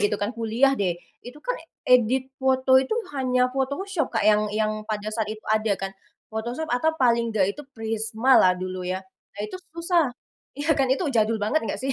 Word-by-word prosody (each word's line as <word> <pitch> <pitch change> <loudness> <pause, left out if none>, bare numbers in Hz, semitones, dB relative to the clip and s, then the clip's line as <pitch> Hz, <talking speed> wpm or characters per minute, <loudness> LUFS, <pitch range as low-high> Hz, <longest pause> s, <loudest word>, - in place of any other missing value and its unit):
gitu 205 0 +2
kan 205 +4 -2
kuliah 230 +4 +2
deh, 180 -3 +1 0.2
itu 245 +4 -11
kan, - - 0 0.3
eee, 250 0 +7
edit 260 +3 -2
foto 260 0 +4
itu 265 +10 -1 0.2
hanya 255 -2 +1
Photoshop, 280 +5 -1
Kak, - - +1
yang 210 0 +4
yang 215 0 -1
pada 215 0 -3
saat 215 -1 -1
itu 215 0 -7
ada 215 -1 +1
kan. 195 0 -5 0.4
Photoshop 240 +7 -3
atau 250 +6 +2
paling 235 -4 +3
nggak 200 -3 +1
itu 295 - -10
Prisma 225 +3 0
lah 185 - +5
dulu 185 0 -5
ya. 185 +1 -1 0.4
Nah - - -6
itu 210 - -6 0.2
susah, 335 -3 +2 0.5
iya 290 +3 +2
kan, 275 -3 +1
itu 265 +8 +1
jadul 225 -1 +2
banget 215 +9 +1
nggak - - -2
sih? 270 - 0
235 Hz, 195 wpm, -25 LUFS, 215-265 Hz, 0.5 s, eee